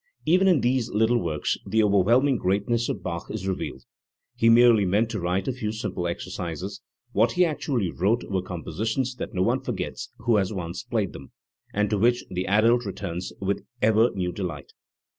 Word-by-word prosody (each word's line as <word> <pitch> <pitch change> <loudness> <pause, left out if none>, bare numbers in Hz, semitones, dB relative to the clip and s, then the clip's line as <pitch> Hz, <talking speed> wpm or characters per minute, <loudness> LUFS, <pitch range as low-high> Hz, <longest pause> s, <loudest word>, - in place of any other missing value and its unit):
Even 185 +4 +4
in 175 -8 +4
these 125 -1 +1
little 110 +3 +2
works 80 -6 -1
the 110 +3 +2
overwhelming 115 +7 +3
greatness 105 +5 0
of - - -3
Bach 85 -2 -4
is 100 -3 -4
revealed. 95 - -4 0.5
He 115 - +3
merely 115 -2 +6
meant 105 +5 +1
to 110 - -3
write 90 +2 -1
a 130 - 0
few 110 -4 -3
simple 105 -5 -3
exercises; 90 +1 -5 0.3
what - - +2
he 180 0 +4
actually 135 - -1
wrote 105 +7 +1
were 95 -1 -2
compositions 110 +8 -3
that - - -6
no 90 - +2
one - - +2
forgets - - -5
who 115 -1 +2
has 95 -1 0
once 90 -2 -4
played 110 -5 -2
them, 70 -1 -11 0.4
and 105 +1 +1
to 105 - +1
which 120 +3 +2
the 90 0 -2
adult 115 +4 +4
returns 90 -2 -5
with 100 +1 -1 0.2
ever 110 +2 +4
new 90 -2 -1
delight. 85 -7 -6
105 Hz, 180 wpm, -25 LUFS, 95-120 Hz, 0.5 s, merely